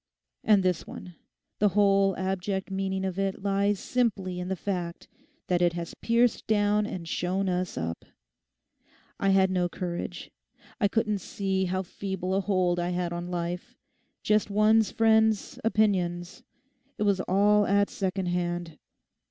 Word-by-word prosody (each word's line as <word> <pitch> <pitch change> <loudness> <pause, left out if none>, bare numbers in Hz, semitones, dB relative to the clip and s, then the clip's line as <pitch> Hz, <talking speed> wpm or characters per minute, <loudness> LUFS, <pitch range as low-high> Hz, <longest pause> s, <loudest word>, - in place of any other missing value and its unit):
And 205 -3 +4
this 180 -3 0
one—the 185 +3 -5
whole 195 -1 +3
abject 190 +1 -2
meaning 190 0 -2
of 190 0 -3
it 195 0 -2
lies 200 0 +1
simply 195 -8 -1
in 180 - -4
the 190 - -1
fact 175 -2 -4 0.4
that 180 -1 +1
it 175 -1 +3
has 170 -1 -5
pierced 235 +1 +1
down 210 0 +2
and 175 -5 -6
shown 185 +3 -1
us 180 0 -2
up. 80 0 -4 1.2
I 195 - +2
had 190 -1 +4
no 180 -1 +1
courage. 175 -1 -5 0.5
I 205 - +4
couldn't 210 -1 0
see 190 0 -2
how 185 +1 -1
feeble 190 0 -4
a 195 - +2
hold 185 -3 +1
I 175 0 -1
had 175 -1 -2
on 175 +1 -5
life—just 180 +4 -3
one's 215 +1 +4
friends' 220 -1 +2
opinions. 185 -5 0 0.6
It - - -1
was 200 -2 +2
all 205 +2 +4
at 200 0 +2
second 190 -1 -2
hand. 175 -3 -2
190 Hz, 145 wpm, -27 LUFS, 180-205 Hz, 1.2 s, And